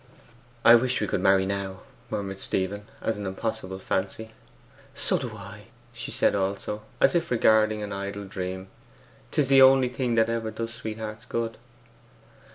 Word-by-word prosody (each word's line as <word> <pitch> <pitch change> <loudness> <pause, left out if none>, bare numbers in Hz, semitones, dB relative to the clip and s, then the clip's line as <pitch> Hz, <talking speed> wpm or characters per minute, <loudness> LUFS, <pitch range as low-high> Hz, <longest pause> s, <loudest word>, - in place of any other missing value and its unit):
'I 115 - +10
wish 130 +2 0
we - - 0
could 90 - -1
marry 95 0 +4
now,' 95 -1 -3 0.3
murmured 95 -1 -4
Stephen, 100 +3 -2
as 110 - -1
an 100 -1 -4
impossible 95 -1 -4
fancy. 95 +3 -3 0.6
'So - - 0
do - - -5
I,' - - -10 0.3
said - - 0
she - - -3
also, 100 +2 -2 0.2
as - - +5
if 170 -1 +1
regarding 110 -2 +3
an 100 -1 -4
idle 100 +1 -4
dream. 95 0 -5 0.6
''Tis 145 - +1
the 135 0 +6
only 130 -1 +7
thing 125 -1 -1
that 115 0 +4
ever 115 -1 -1
does 115 +1 -5
sweethearts 110 0 -6
good! 115 -1 -2
110 Hz, 160 wpm, -26 LUFS, 95-115 Hz, 0.6 s, I